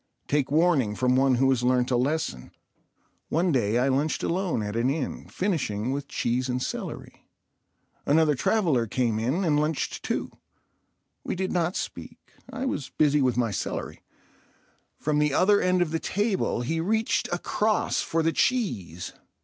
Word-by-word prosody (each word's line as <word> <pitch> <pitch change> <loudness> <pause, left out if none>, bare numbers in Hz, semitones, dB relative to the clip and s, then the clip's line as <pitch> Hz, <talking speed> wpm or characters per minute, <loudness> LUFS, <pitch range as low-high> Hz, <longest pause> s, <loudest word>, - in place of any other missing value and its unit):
Take 145 -2 +1
warning 145 -8 +2
from 125 +1 +2
one 135 0 +4
who 135 +2 +3
has 130 -2 +1
learnt 125 0 +2
a - - +3
lesson. 125 - -1 0.8
One 170 +3 +1
day 115 -5 +1
I 125 +2 +2
lunched 140 +4 0
alone 175 - 0
at 105 +1 -4
an 120 +3 +1
inn, 140 -1 -3
finishing 130 - -1
with 140 0 -3
cheese 125 +1 -1
and 125 0 0
celery. - - -6 0.8
Another 155 +1 +3
traveller 145 - +1
came 115 -1 0
in 135 - 0
and 150 -3 +3
lunched 150 0 -1
too. - - -2 0.9
We - - -3
did 190 +1 -2
not 175 +1 0
speak—I 265 0 -7
was 140 - -3
busy 150 -1 +2
with 125 -2 +1
my 120 -3 +1
celery. - - -4 1.0
From 150 0 0
the 150 -1 +2
other 200 +4 +4
end 180 -1 +3
of 160 - -5
the 165 - 0
table 205 - 0
he 160 +7 -1
reached 220 +6 0
across 210 +4 0
for 165 0 0
the 165 0 +1
cheese. 110 - -1
145 Hz, 155 wpm, -26 LUFS, 125-175 Hz, 1.0 s, one